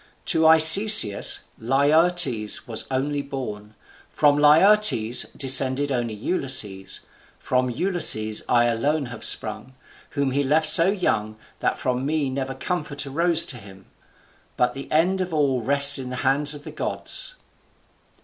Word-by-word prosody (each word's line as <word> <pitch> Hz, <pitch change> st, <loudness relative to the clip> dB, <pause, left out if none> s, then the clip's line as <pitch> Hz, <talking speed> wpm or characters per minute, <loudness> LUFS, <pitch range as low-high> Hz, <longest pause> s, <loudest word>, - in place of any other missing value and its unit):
To 160 Hz, 0 st, +2 dB
Arcesius, 160 Hz, -, +6 dB, 0.2 s
Laertes 140 Hz, -2 st, +1 dB, 0.3 s
only 140 Hz, +2 st, -3 dB
was 140 Hz, -, -16 dB
born, 105 Hz, -6 st, -8 dB, 0.3 s
from 145 Hz, -1 st, +1 dB
Laertes 150 Hz, -, +3 dB
descended 135 Hz, +1 st, +1 dB
only 120 Hz, -4 st, -3 dB
Ulysses, 110 Hz, -, -2 dB, 0.4 s
from 125 Hz, 0 st, -2 dB
Ulysses 125 Hz, -, 0 dB
I 120 Hz, -1 st, +2 dB
alone 140 Hz, +6 st, -1 dB
have -, -, -10 dB
sprung, 110 Hz, +4 st, -1 dB, 0.4 s
whom 140 Hz, -2 st, -1 dB
he 140 Hz, +2 st, -1 dB
left 155 Hz, +3 st, +1 dB
so 165 Hz, +3 st, +4 dB
young 110 Hz, -, -2 dB, 0.2 s
that -, -, -2 dB
from 125 Hz, 0 st, -3 dB
me 145 Hz, -1 st, -2 dB
never 135 Hz, 0 st, -5 dB
comfort 150 Hz, -6 st, -5 dB
arose 165 Hz, +4 st, +2 dB
to 125 Hz, -, -4 dB
him. 95 Hz, -3 st, -15 dB, 0.7 s
But 125 Hz, 0 st, 0 dB
the 135 Hz, -, -10 dB
end 180 Hz, +5 st, 0 dB
of 180 Hz, -3 st, -5 dB
all 135 Hz, -4 st, 0 dB
rests 140 Hz, +3 st, +3 dB
in 130 Hz, -1 st, -7 dB
the 125 Hz, -, -6 dB
hands 145 Hz, +3 st, 0 dB
of 145 Hz, -, -13 dB
the -, -, -10 dB
gods." -, -, -3 dB
140 Hz, 140 wpm, -22 LUFS, 125-155 Hz, 0.7 s, Arcesius